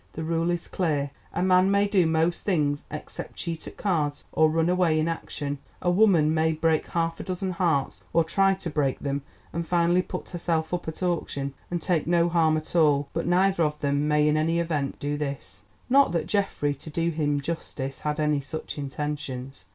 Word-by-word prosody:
The 160 - -5
rule 165 +1 0
is 175 -1 -2
clear. 145 -6 -1 0.2
A - - -1
man 185 0 +4
may 200 +1 +3
do 190 -5 +3
most 160 +2 +1
things 150 -7 0
except 150 - -7
cheat 165 -2 -5
at - - -10
cards 155 -7 -1
or 155 0 +4
run 165 +1 +1
away 175 -3 +3
in 155 - +1
action; 145 -3 -4 0.2
a 175 - +1
woman 175 -6 +4
may 160 0 +2
break 160 0 +1
half 165 -1 -1
a - - -4
dozen 185 0 -3
hearts, 170 -6 0
or 165 - +4
try 195 +4 +2
to 185 -2 -5
break 140 -3 0
them, 140 0 -2 0.3
and 170 0 -3
finally 175 +1 +3
put - - -7
herself 170 -2 -1
up 175 -2 -2
at 160 +3 -5
auction 140 -6 -1 0.2
and 175 -2 -3
take 170 -5 +1
no 170 0 +3
harm 160 -2 +3
at 155 +2 -7
all—but 150 0 +2
neither 185 +1 +3
of 150 -1 -1
them 145 0 +1
may 150 0 +3
in 150 0 +3
any 165 +2 +1
event 155 -5 -1
do 145 +1 -2
this. 135 - -6 0.2
Not 275 -6 +4
that 165 -2 0
Geoffrey, 195 -8 0
to 140 +3 -11
do 165 +2 0
him 145 -2 0
justice, 135 -3 -4
had 150 0 -2
any 150 -2 +2
such 150 +2 -6
intentions. 140 -2 -5
160 Hz, 195 wpm, -26 LUFS, 145-175 Hz, 0.3 s, man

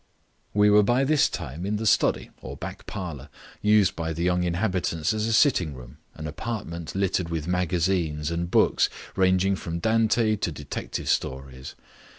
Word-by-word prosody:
We 105 0 +5
were 105 0 +7
by 120 +6 +2
this 150 +1 +3
time 80 0 -6
in 100 +2 -1
the 110 +2 -3
study - - +2
or - - -8
back - - -8
parlour, 75 -7 -6 0.3
used 105 -2 +4
by 80 0 -3
the 85 +2 -3
young 90 0 +2
inhabitants 90 -1 0
as 110 0 -1
a - - 0
sitting 95 - +3
room, 65 +3 -12 0.2
an 75 - -7
apartment 85 -2 -5
littered 95 -3 0
with 80 -2 -3
magazines 85 -3 0
and 85 +1 -2
books - - +3 0.3
ranging 95 +1 +3
from 85 -2 -5
Dante 110 +2 +2
to 90 - -2
detective 75 -2 -5
stories. 65 0 -3
90 Hz, 160 wpm, -25 LUFS, 80-105 Hz, 0.3 s, were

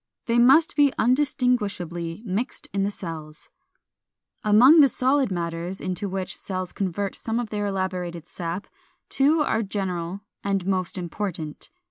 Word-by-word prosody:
They 235 -1 +2
must 270 +7 +5
be 285 -2 +5
undistinguishably 215 - 0
mixed 210 +5 -3
in 200 - 0
the 195 - +1
cells. 160 -6 -8 0.9
416. 215 - -2
Among 255 +10 +8
the 280 - +8
solid 260 -1 +2
matters 170 +1 -3
into 185 +2 -3
which 190 0 -4
cells 185 -2 -5
convert 195 +1 -2
some 225 +1 -2
of 235 -3 -4
their 205 -1 -1
elaborated 180 -3 -3
sap 175 +3 -4 0.4
two 300 +4 +3
are 225 -6 +1
general 190 -3 -3 0.2
and 195 -2 0
most 185 -1 -1
important. 170 -4 -5
195 Hz, 140 wpm, -25 LUFS, 175-235 Hz, 0.9 s, Among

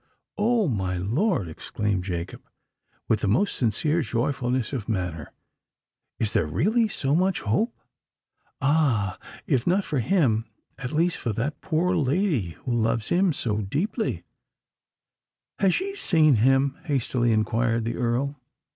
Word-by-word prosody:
"Oh! 220 -1 +2
my 95 -7 -1
lord," 115 - 0
exclaimed 95 +4 -3
Jacob, 85 -2 -4 0.7
with 110 - +2
the 105 - -1
most 130 - +2
sincere 150 +8 +1
joyfulness 125 0 -1
of 120 -4 -4
manner, 90 -8 -3 0.9
"is 110 -2 0
there 80 - +2
really 220 - +2
so 140 -9 -1
much 185 +3 +2
hope? 215 - 0 0.8
Ah! 135 - +2 0.3
if 125 -2 0
not 185 +3 +2
for 145 - -1
him—at 125 - -1
least 165 +3 +1
for 115 - -2
that 130 +8 -3
poor 180 +2 +1
lady 140 - 0
who 125 - -1
loves 115 -1 0
him 185 +1 +3
so 115 -7 -1
deeply——" 180 - -2 1.4
"Has 195 -3 +3
she 395 +1 -2
seen 155 - +4
him?" 135 +4 +3
hastily 125 -5 +1
inquired 115 +1 +1
the 115 - -2
Earl. 125 +4 0
130 Hz, 130 wpm, -25 LUFS, 110-170 Hz, 1.4 s, seen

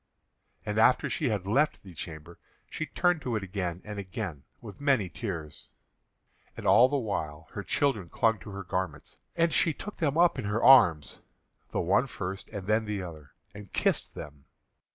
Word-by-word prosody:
And 105 +1 -1
after 125 +3 +4
she 150 -6 0
had 100 -4 -2
left 140 +10 +1
the 95 -3 -12
chamber, 80 0 -9 0.3
she 155 - -4
turned 175 -2 +1
to 125 -4 -2
it 105 - -2
again 90 -2 -4
and 105 -1 -6
again 85 -7 -5
with 110 +2 -11
many 135 -10 +2
tears. 85 -8 -6 0.9
And - - -7
all 125 +2 +6
the 145 - +1
while 80 - -4
her - - -5
children 110 -12 0
clung 115 +3 +2
to 105 - -10
her 100 -1 -6
garments, 90 -4 -4 0.2
and 170 -1 +2
she 160 - +3
took 210 - -7
them 155 -2 0
up 170 -5 +4
in 120 - -4
her 105 +3 -1
arms, 85 - +6 0.5
the - - -1
one 100 +9 +2
first 95 -5 -6
and 100 -4 -6
then 110 +2 +2
the 105 -3 -3
other, 80 -5 -10 0.2
and 105 -2 -11
kissed - - 0
them. 70 -2 -10
100 Hz, 180 wpm, -29 LUFS, 85-125 Hz, 0.9 s, all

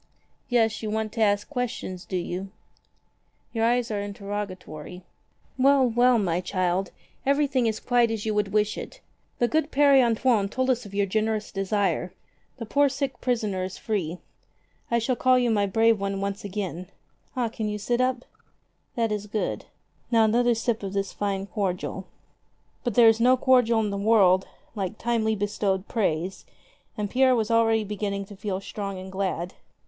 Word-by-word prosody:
Yes, 225 -3 +2
you 215 - -3
want 220 0 -2
to 225 - -4
ask 205 -1 +2
questions, 235 -9 -4
do 185 - -3
you? 180 +2 -4 1.0
Your 225 -1 0
eyes 240 0 +1
are 210 - -1
interrogatory. 195 -5 -6 0.6
Well, 270 0 +5
well, 240 +1 +4
my 180 -4 0
child, 185 0 -1 0.3
everything 275 -3 +2
is 220 -1 -1
quite 245 -2 +2
as 225 -2 -3
you 215 - 0
would 210 -1 +1
wish 210 0 +1
it. - - -9 0.4
The 240 - +2
good 310 +3 0
Pere 280 -2 +5
Antoine 230 -3 +2
told 260 +4 +1
us 245 -4 -2
of 200 - -11
your 200 0 +2
generous 215 +2 -1
desire. 195 -2 -1 0.4
The 230 - -6
poor 285 +5 +3
sick 270 -2 -3
prisoner 215 -7 -1
is 185 0 -5
free. 180 -7 -2 0.7
I 235 - +2
shall 235 +2 0
call 255 +1 +4
you 245 -2 +2
my 205 -2 +2
brave 225 +2 +3
one 195 0 -2
once 200 0 -3
again. 185 -3 -4 0.5
Ah, 255 - 0
you 230 - 0
can 210 -2 -3
sit 240 +4 0
up? 255 -1 0 0.7
That 230 -2 0
is 210 0 -3
good. 210 0 -3 0.4
Now, 225 -2 +4
another 240 +2 +3
sip 225 0 -1
of 195 -1 -5
this 195 0 -2
fine 195 -1 -2
cordial." 190 -2 -3 0.8
But 240 -4 -2
there 235 -2 +7
is 225 0 +5
no 250 +2 +5
cordial 245 -3 +4
in 210 -2 -1
the 200 - -3
world 195 -3 +4 0.3
like 200 -1 -4
timely 225 -2 0
bestowed 200 -1 -1
praise, 185 -4 -1 0.5
and 210 -1 -1
Pierre 255 +4 +3
was 225 -1 0
already 225 -1 +3
beginning 200 -1 -3
to 205 - -12
feel 190 -1 -3
strong 195 -1 -5
and 190 +1 -8
glad. 185 -2 -2
215 Hz, 175 wpm, -26 LUFS, 195-240 Hz, 1.0 s, there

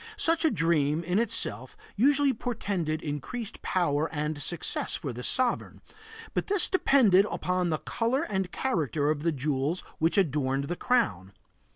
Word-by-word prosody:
Such 330 0 +3
a 320 - +5
dream, 165 - +1
in 180 +4 +1
itself, 130 - -2 0.2
usually 280 +4 +3
portended 195 -10 -3
increased 165 - -5
power 160 -4 0
and 150 -1 -3
success 175 +3 -2
for 135 -5 -4
the 120 - -7
sovereign, 250 - 0 0.5
but - - -1
this 400 -2 +3
depended 230 - +4
upon 180 -1 -1
the 155 - 0
color 240 - -1
and 190 - -2
character 155 - 0
of 150 -2 -2
the 165 +1 +1
jewels 145 +3 -1 0.2
which 165 +5 +1
adorned 140 -6 +1
the 175 +5 -3
crown. 135 - 0
170 Hz, 150 wpm, -28 LUFS, 150-230 Hz, 0.5 s, a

